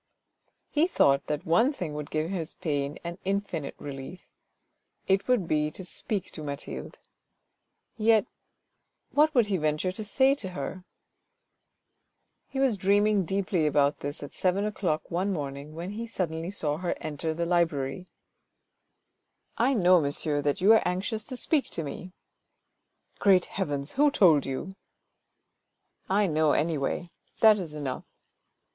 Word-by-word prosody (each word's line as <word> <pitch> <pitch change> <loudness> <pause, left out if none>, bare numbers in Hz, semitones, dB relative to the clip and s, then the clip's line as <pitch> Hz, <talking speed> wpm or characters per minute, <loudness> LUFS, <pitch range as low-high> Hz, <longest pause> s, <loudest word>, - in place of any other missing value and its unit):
He 315 +3 +3
thought 140 - +3
that 150 +3 -3
one 180 - +4
thing 175 - -5
would 150 -1 -5
give 155 +3 -1
his 170 -5 -3
pain 145 -1 -2
an 170 +1 -6
infinite 195 -6 -2
relief: 140 +5 -8 0.8
it 195 0 +2
would 245 -9 +2
be 150 -1 +1
to 185 +4 -7
speak 195 +1 -3
to 155 - -7
Mathilde. 140 -1 -6 1.0
Yet 220 0 +4 0.9
what 305 +1 +3
would 240 -3 +5
he 200 -2 0
venture 155 +3 0
to 200 +4 -6
say 265 +6 +3
to 215 -9 -5
her? 185 -1 -5 1.6
He 270 - -5
was 260 -6 +2
dreaming 200 +1 +3
deeply 190 -3 0
about 145 -1 +2
this 145 +1 -5
at 145 - -8
seven 190 +2 +1
o'clock 180 -7 -2
one 185 +4 0
morning 145 -2 -5
when 175 +4 -5
he 230 +3 -5
suddenly 165 -5 -3
saw 155 -7 -2
her 175 +1 -2
enter 155 +1 -3
the 170 +1 -1
library. 170 -2 0 0.8
" - - -48
I 275 - +2
know, 180 -4 +5
monsieur, 145 +1 0
that 145 +3 -1
you 205 +4 +7
are 225 - +5
anxious 195 +5 -2
to 255 - -5
speak 295 +2 +1
to 165 - -4
me." 180 +5 -7 0.6
" - - -43
Great 190 -3 +5
heavens! 145 -7 -3
who 295 +2 +4
told 170 - +4
you? 135 +8 -4 0.4
" - - -52
" - - -53 0.3
I 205 +2 +3
know, 155 -3 +2
anyway; 160 +2 -1 0.3
that 215 -2 +7
is 160 -5 -6
enough. 140 -4 -4
175 Hz, 150 wpm, -28 LUFS, 150-200 Hz, 1.6 s, you